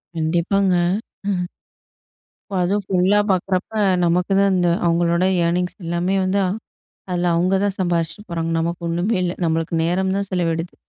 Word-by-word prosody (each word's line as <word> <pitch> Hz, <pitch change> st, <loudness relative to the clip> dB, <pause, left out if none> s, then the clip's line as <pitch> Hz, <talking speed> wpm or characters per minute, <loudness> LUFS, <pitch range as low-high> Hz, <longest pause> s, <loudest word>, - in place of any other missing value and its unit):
கண்டிப்பாங்க. 175 Hz, +4 st, +1 dB, 0.6 s
ம். 180 Hz, -2 st, -1 dB, 1.0 s
இப்ப 190 Hz, -, 0 dB
அதுவும் 200 Hz, +3 st, 0 dB
ஃபுல்லா 190 Hz, +1 st, +2 dB
பார்க்குறப்ப, 185 Hz, +2 st, -1 dB, 0.3 s
நமக்கு 175 Hz, +2 st, +1 dB
தான் 200 Hz, 0 st, +4 dB
அந்த 180 Hz, -1 st, +2 dB, 0.2 s
அவுங்களோட 170 Hz, +1 st, +2 dB, 0.2 s
ஏர்னிங்ஸ் 180 Hz, +1 st, 0 dB
எல்லாமே 175 Hz, +3 st, 0 dB
வந்து 190 Hz, +2 st, +1 dB
அ -, -, +1 dB, 0.6 s
அதில 175 Hz, -1 st, +1 dB
அவுங்க 180 Hz, +3 st, +2 dB
தான் 200 Hz, -1 st, 0 dB
சம்பாரிச்சுட்டு 170 Hz, 0 st, -1 dB
போறாங்க. 165 Hz, -1 st, -2 dB
நமக்கு 170 Hz, +2 st, -2 dB
ஒண்ணுமேல்ல! 180 Hz, +1 st, 0 dB
நம்மளுக்கு 165 Hz, 0 st, -1 dB
நேரம் 190 Hz, +3 st, 0 dB
தான் 200 Hz, 0 st, -1 dB
செலவிடுது. 170 Hz, -2 st, -1 dB
180 Hz, 140 wpm, -21 LUFS, 170-190 Hz, 1.0 s, தான்